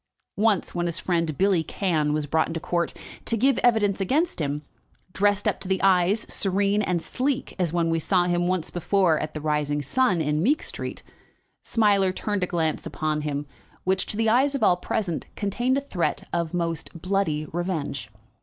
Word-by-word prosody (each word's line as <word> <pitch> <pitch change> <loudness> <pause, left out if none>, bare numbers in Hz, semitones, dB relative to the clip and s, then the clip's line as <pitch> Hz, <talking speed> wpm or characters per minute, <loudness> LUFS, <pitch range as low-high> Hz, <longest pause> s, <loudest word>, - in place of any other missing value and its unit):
Once, 210 -2 +2
when 175 -1 -1
his 170 - -2
friend, 165 -5 -1
Billy 195 -3 +3
Cann, 160 -5 0
was 150 0 0
brought 160 +2 +1
into 165 0 -4
court 170 +1 -1 0.3
to 230 - +1
give 265 +3 +3
evidence 210 -5 +2
against 285 - +1
him, 145 0 -2 0.5
dressed 205 0 +2
up - - 0
to 195 - -7
the 190 0 +1
eyes, 190 +2 +3
serene 200 +1 +1
and 180 -4 0
sleek 270 +1 -2
as 175 -4 +1
when 170 -1 +1
we 165 - +1
saw 180 +2 +2
him 175 0 +1
once 180 -3 -1
before 175 -1 +2
at 155 0 -5
the 155 - -4
"Rising 150 -1 0
Sun," 205 - +2
in 150 0 0
Meek 280 - +2
Street, - - -6 0.6
Smiler 200 -4 +3
turned 205 +1 -2
a - - +1
glance 160 -3 -1
upon 155 -1 -2
him 145 -1 -3 0.4
which, 190 0 +1
to 210 - -3
the 225 0 +2
eyes 265 +5 +3
of 275 - -1
all 180 - +5
present, 180 -2 -2
contained 240 +6 0
a - - 0
threat 195 -11 -2
of 170 -2 -1
most 170 -1 -3
bloody 180 -4 0
revenge. 155 - -3
180 Hz, 185 wpm, -25 LUFS, 160-205 Hz, 0.6 s, all